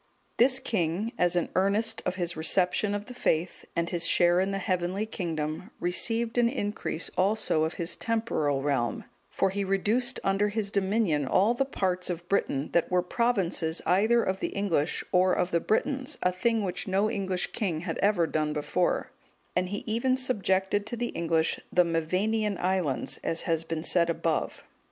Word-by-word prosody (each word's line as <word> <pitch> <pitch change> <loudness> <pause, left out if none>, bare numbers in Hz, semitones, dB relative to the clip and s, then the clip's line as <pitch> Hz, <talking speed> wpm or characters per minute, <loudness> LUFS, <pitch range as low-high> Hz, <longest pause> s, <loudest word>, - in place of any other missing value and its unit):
This 260 +2 +5
king, 195 +2 -1
as 180 0 +2
an 175 - 0
earnest 200 +4 +1
of 180 - -1
his 175 -2 -2
reception 180 +5 +1
of 205 0 -4
the 250 - -9
faith, 175 -7 -1
and 170 0 0
his 170 -2 0
share 175 0 +4
in 190 +1 +1
the 195 - -2
heavenly 185 +2 -1
kingdom, 160 -5 -4
received 225 +6 +1
an 235 -1 +4
increase 205 - -2
also 190 -5 +2
of 160 - -4
his 170 -1 -2
temporal 155 -12 -1
realm, 135 -5 0 0.3
for 195 - 0
he 200 +1 -2
reduced 215 +7 +1
under 195 +2 +2
his 205 -1 -2
dominion 190 -8 +1
all 205 - +3
the 270 +3 0
parts 185 -8 -1
of 175 0 -4
Britain(208) 145 -8 0
that 170 - +2
were 180 -1 +2
provinces 180 -7 0
either 220 +6 +3
of 190 0 -1
the - - -1
English, 180 -6 0
or 185 0 +4
of 180 +1 0
the 170 - +2
Britons, 265 - -1
a 180 - +3
thing 225 +4 0
which 185 +2 -2
no 195 +2 +2
English 190 -4 -2
king 175 -7 -2
had 165 -2 -4
ever 200 -4 +3
done 155 -1 -1
before; 155 +4 -1 0.4
and 180 0 0
he 205 +1 -4
even 235 +4 +1
subjected 205 -5 0
to 240 - -4
the 240 +1 -2
English 165 -1 0
the 180 0 +4
Mevanian 190 +6 0
islands, 180 -7 -1
as 165 - -1
has 165 -2 0
been 165 -1 -4
said 170 -1 +3
above. 165 -1 -1
185 Hz, 175 wpm, -28 LUFS, 170-215 Hz, 0.4 s, This